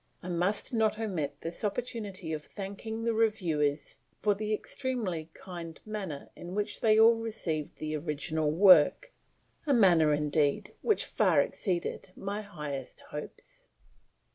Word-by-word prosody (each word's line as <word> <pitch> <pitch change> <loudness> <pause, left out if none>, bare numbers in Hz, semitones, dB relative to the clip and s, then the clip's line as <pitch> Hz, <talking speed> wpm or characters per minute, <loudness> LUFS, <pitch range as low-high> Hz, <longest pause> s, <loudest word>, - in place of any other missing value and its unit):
I 180 - -6
must 180 +8 0
not 220 -2 +2
omit 185 -10 -3
this 165 +5 -4
opportunity 205 -6 -3
of 155 - -3
thanking 205 +4 -6
the 230 0 +1
Reviewers 165 -10 0 0.2
for 210 - +3
the 210 +1 -4
extremely 215 - -2
kind 170 -3 -8
manner 195 -9 -5
in 175 +2 -8
which 210 0 -2
they 220 -1 +5
all 225 +1 +8
received 210 -10 -3
the 155 0 -3
original 155 0 -1
work 185 - +6 0.5
a 280 - +4
manner, 175 -8 +5
indeed, 150 -1 +1
which 430 - +2
far - - +3
exceeded 185 -1 -1
my 200 +2 -4
highest 150 -10 -6
hopes. - - -9
190 Hz, 135 wpm, -30 LUFS, 155-220 Hz, 0.5 s, all